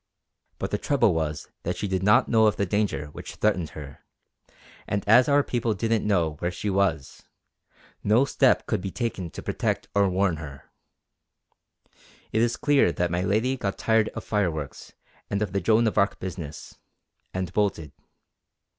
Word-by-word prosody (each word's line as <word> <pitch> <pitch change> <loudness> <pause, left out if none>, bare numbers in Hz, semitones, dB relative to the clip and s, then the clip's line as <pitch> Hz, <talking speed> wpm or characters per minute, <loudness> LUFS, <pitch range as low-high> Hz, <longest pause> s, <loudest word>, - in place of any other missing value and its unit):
But - - -4
the - - -1
trouble - - +2
was 75 -2 -3
that 90 - -3
she 105 - -2
did 95 -1 -1
not 105 +2 +4
know 110 -2 +4
of 105 - +2
the 100 - 0
danger 95 -7 -1
which - - -9
threatened 95 -7 0
her; 70 -2 -10 0.8
and 100 0 -2
as 125 +5 +6
our 145 0 +4
people 120 -4 -1
didn't 110 +1 0
know 85 -7 +1
where 85 - -1
she 100 +3 -3
was, 85 -7 -1 0.8
no 110 +6 +4
step - - +3
could - - -1
be 95 - -4
taken 100 -5 -3
to - - -9
protect - - -2
or 100 -1 +3
warn 90 -2 +1
her. 70 -3 -10 1.6
It 110 - +1
is 120 0 +1
clear 145 - +3
that 85 0 -1
my 85 +1 0
lady 110 +7 +1
got 100 -6 -3
tired 110 -1 +2
of - - -5
fireworks 85 -9 -3 0.4
and 100 - -1
of 95 -3 -5
the 100 - 0
Joan 110 +6 +3
of 110 - +1
Arc 100 +1 +1
business, 85 -5 -7 0.5
and 95 -1 -4
bolted. 95 -8 -1
100 Hz, 170 wpm, -25 LUFS, 85-110 Hz, 1.6 s, as